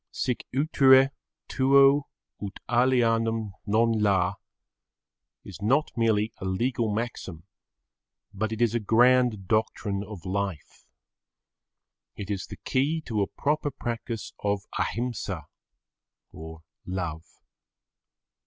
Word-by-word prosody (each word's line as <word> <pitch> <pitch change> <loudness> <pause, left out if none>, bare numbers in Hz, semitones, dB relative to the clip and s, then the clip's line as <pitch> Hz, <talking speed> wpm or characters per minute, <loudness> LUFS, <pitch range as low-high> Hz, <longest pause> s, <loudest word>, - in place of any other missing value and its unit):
Sic 125 - -3
utere 135 -1 +5 0.4
tuo 140 +1 +4 0.3
ut 100 -2 -6
alienum 115 -3 +2 0.2
non 115 +3 +3
la 95 -3 +2 1.1
is - - -11
not 135 +9 +2
merely 110 -1 +1
a 95 - -6
legal 115 +4 0
maxim, 105 -7 -4 0.9
but 110 +2 -2
it 110 +1 0
is 115 -2 +2
a 120 - +1
grand 120 -2 +3
doctrine 105 -2 0
of 100 -4 -10
life. 95 -4 -4 1.3
It 100 0 -6
is 95 -2 -3
the - - -9
key 145 +5 +1
to 110 -8 -2
a 100 - +1
proper 150 0 -1
practice 120 -3 -5
of 100 -1 -1 0.2
Ahimsa 120 0 -3 0.9
or 80 0 -10 0.2
love. 85 -3 -6
110 Hz, 105 wpm, -26 LUFS, 100-125 Hz, 1.3 s, utere